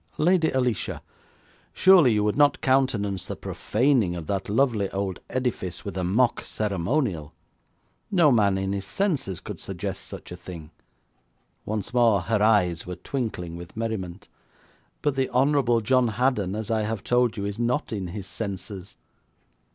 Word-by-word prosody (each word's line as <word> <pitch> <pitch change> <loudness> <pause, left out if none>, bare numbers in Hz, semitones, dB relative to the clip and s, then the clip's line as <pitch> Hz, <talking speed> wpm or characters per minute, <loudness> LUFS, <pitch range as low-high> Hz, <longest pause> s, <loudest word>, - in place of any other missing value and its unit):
'Lady 170 0 +3
Alicia, 125 -5 -1 0.7
surely 185 -9 +6
you 105 -1 +2
would 105 0 +1
not 145 -1 +4
countenance 125 -8 +1
the - - -4
profaning 115 -6 +1
of 85 -2 -6
that 95 +3 -2
lovely 110 -4 +2
old 95 -2 -3
edifice 125 -8 -3
with 100 - -5
a 95 - -2
mock 115 +7 +2
ceremonial? 100 - -1 0.7
No 175 -8 +5
man 100 -5 +3
in 95 0 -1
his 100 -1 -4
senses 145 - -1
could - - -8
suggest - - -5
such - - -9
a - - -5
thing!' 85 -3 -10 1.0
Once 105 +2 -3
more 115 -5 +4
her 105 +4 0
eyes 90 -7 +3
were 90 - -4
twinkling 90 -4 -4
with 85 +4 -10
merriment. 105 -4 -4 0.8
'But 145 -2 +1
the 135 -1 0
Honourable 130 -2 +3
John 125 +2 +3
Haddon, 110 -4 0
as 110 0 -4
I 110 -1 +2
have 110 -1 -3
told 125 -2 +2
you, 100 - -2
is 100 +2 -4
not 120 +2 0
in 95 -4 -3
his 95 +2 -6
senses.' 100 -1 -6
110 Hz, 155 wpm, -25 LUFS, 95-125 Hz, 1.0 s, surely